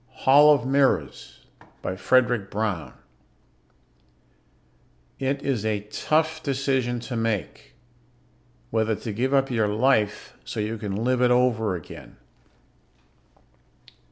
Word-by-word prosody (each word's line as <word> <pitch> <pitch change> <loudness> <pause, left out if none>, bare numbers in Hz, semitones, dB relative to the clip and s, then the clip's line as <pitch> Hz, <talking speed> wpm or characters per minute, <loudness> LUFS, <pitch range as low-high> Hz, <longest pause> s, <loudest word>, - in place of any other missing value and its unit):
net - - -31
Hall 145 +3 +7
of 140 -5 +2
Mirrors 135 0 0 0.4
By 95 - -3
FREDRIC 120 0 +1
BROWN 100 -7 -3 2.3
_It 135 +1 -2
is 125 -7 -1
a 110 -2 -1
tough 160 0 0
decision 135 -3 -1
to 125 +1 -6
make 110 - -3 1.0
whether 110 -1 +1
to 110 +1 -6
give 125 +5 -1
up 135 -1 +2
your 110 -3 +1
life 105 -1 0
so - - -6
you 110 +1 -3
can 100 -2 -4
live 125 +4 0
it 125 - +4
over 120 -5 +2
again! 85 - -11
120 Hz, 115 wpm, -24 LUFS, 105-135 Hz, 2.3 s, Hall